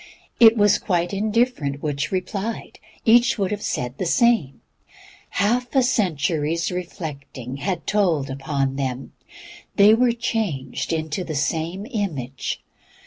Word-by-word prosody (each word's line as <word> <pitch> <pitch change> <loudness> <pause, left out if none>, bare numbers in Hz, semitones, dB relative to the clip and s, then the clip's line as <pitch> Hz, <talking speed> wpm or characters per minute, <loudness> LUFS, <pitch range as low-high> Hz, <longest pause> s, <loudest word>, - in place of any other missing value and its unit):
It 230 0 +8
was 205 -1 +4
quite 175 -1 -1
indifferent 210 - 0
which 145 0 -2
replied, 195 +4 -4 0.3
each 240 +1 +5
would 195 -2 -1
have 210 -1 -3
said 125 +1 -3
the 185 - -1
same. 225 - +2 0.7
Half 245 +5 0
a 265 - +5
century's 165 - 0
reflecting 150 - -6
had 180 +5 -3
told 175 -9 +1
upon 135 0 -2
them; 130 -1 -3 0.6
they 205 +2 +7
were 240 +2 +4
changed 215 - -2
into 160 +2 -2
the 160 -3 -5
same 165 +7 -2
image. 160 - -4
180 Hz, 125 wpm, -22 LUFS, 140-215 Hz, 0.7 s, It